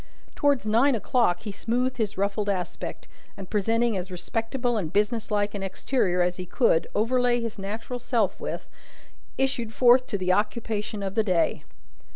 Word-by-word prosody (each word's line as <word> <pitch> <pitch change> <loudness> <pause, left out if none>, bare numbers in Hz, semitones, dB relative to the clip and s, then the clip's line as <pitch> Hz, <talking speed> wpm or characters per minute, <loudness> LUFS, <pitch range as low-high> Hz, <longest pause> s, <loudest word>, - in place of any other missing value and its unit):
Towards 285 -5 +2
nine 235 +6 +4
o'clock 220 -4 +1
he 210 - -5
smoothed 245 +5 -1
his 215 -3 -2
ruffled 200 +1 0
aspect, 185 -3 -4 0.3
and, 195 -2 -9
presenting 225 +2 +1
as 185 0 -3
respectable 230 +7 -2
and 175 -8 -2
business 210 +2 0
like 205 -1 0
an 200 - -4
exterior 190 -1 0
as 180 0 -1
he 185 - -5
could 175 -6 +2
overlay 245 +2 +2
his 230 -3 -5
natural 220 +5 -5
self 230 -5 0
with, - - -5 0.7
issued 265 -4 0
forth 250 +2 +5
to 205 - -1
the 185 -1 +1
occupation 210 0 -1
of 195 -1 -3
the 220 - +3
day. 180 -5 +1
215 Hz, 165 wpm, -26 LUFS, 195-240 Hz, 0.7 s, forth